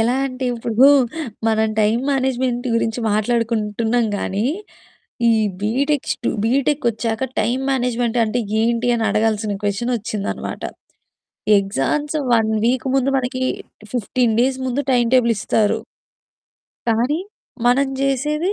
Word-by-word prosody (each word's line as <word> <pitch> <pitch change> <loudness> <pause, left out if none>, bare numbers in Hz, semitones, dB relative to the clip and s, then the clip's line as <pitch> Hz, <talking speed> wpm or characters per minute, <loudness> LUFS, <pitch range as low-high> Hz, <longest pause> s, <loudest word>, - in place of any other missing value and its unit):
ఎలా 240 +3 +2
అంటే 255 0 -5
ఇప్పుడు 230 +2 +3 0.6
మనం 220 0 +2
టైమ్ 215 +3 +2
మేనేజ్మెంట్ 255 -2 0
గురించి 225 +1 0
మాట్లాడుకుంటున్నాం 225 +1 0
గానీ 200 +5 -1 0.8
ఈ - - +5 0.3
బీటెక్ 270 +7 0
స్టు 235 - -4 0.2
బీటెక్ 275 +4 +1
వచ్చాక 225 +2 -2 0.2
టైమ్ 245 +5 0
మేనేజ్మెంట్ 245 -2 0
అంటే 240 +3 -1 0.2
ఏంటి 235 +1 +1
అనడగాల్సిన 215 -1 0
క్వెషన్ 210 +5 -1
వచ్చిందన్నమాట. 215 -2 -4 1.0
ఎగ్జామ్స్ 205 - -1 0.2
1 225 -1 +3 0.2
వీక్ 255 +2 +1
ముందు 270 0 +2
మనకి 255 0 -2 0.5
15 240 0 +1
డేస్ 260 +1 +1
ముందు 255 +3 0
టైమ్ 240 -1 +3
టేబుల్ 235 -2 +4
ఇస్తారు. 215 +2 +1 1.1
కానీ 240 +7 +1 0.5
మనం 270 +3 +4
జేసేది 300 +7 0
240 Hz, 115 wpm, -20 LUFS, 220-260 Hz, 1.1 s, ఈ